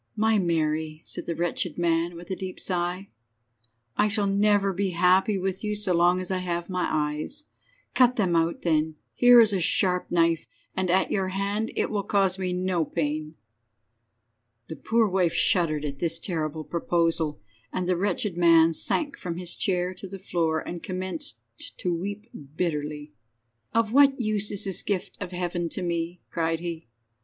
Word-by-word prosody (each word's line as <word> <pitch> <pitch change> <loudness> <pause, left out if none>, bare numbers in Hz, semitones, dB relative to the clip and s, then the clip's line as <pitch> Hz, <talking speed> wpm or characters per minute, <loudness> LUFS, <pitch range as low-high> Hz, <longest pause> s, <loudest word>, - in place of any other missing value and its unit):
"My 220 0 +3
Mary," 155 -3 -1
said - - -7
the 170 - -2
wretched 170 0 -2
man, 170 0 +1
with 175 +2 -9
a - - 0
deep 185 -1 -6
sigh. 180 +1 -2 0.9
"I 210 - +3
shall 210 0 0
never 200 0 +3
be 195 +1 0
happy 185 +3 +4
with 190 +1 -3
you 210 0 -1
so 205 -3 0
long 175 +1 +4
as 185 0 -5
I 185 - 0
have 175 0 -3
my 180 -1 0
eyes. 150 - -2 0.5
Cut 250 -1 +5
them 185 -7 +1
out, 165 0 +1
then. 160 -2 +1 0.2
Here 245 0 +7
is 220 -3 +5
a 190 - +1
sharp 180 +1 +2
knife, 165 -2 +2 0.3
and 185 -1 0
at 185 +2 +2
your 190 -2 0
hand 200 +3 -2
it - - 0
will 210 -2 0
cause 195 -1 +1
me 185 -1 -1
no 180 -1 0
pain." 155 -1 -3 1.3
The 160 - -5
poor 225 +4 +2
wife 185 -3 +1
shuddered 155 -5 +2
at 140 -2 -5
this 165 -1 +1
terrible 160 -3 -2
proposal, 165 -2 0 0.3
and 185 -1 -2
the 180 - +2
wretched 200 +1 -1
man 165 -1 +5
sank 285 - -1
from 170 -2 -4
his 175 -1 -3
chair 180 -2 0
to 195 - -9
the 195 +1 -7
floor, 165 -4 -1
and 175 -1 -5
commenced 185 -9 -4 0.4
to 175 -2 -1
weep 200 +5 -5 0.3
bitterly. 150 -3 -3 0.6
"Of 230 -1 +1
what 275 0 +6
use 215 -3 0
is 205 - -2
this 190 -1 -1
gift 200 -1 -3
of 185 -2 -4
Heaven 175 -1 -2
to - - -4
me?" 170 0 -2
cried 165 -1 0
he. 170 -3 -6
180 Hz, 175 wpm, -26 LUFS, 165-195 Hz, 1.3 s, Here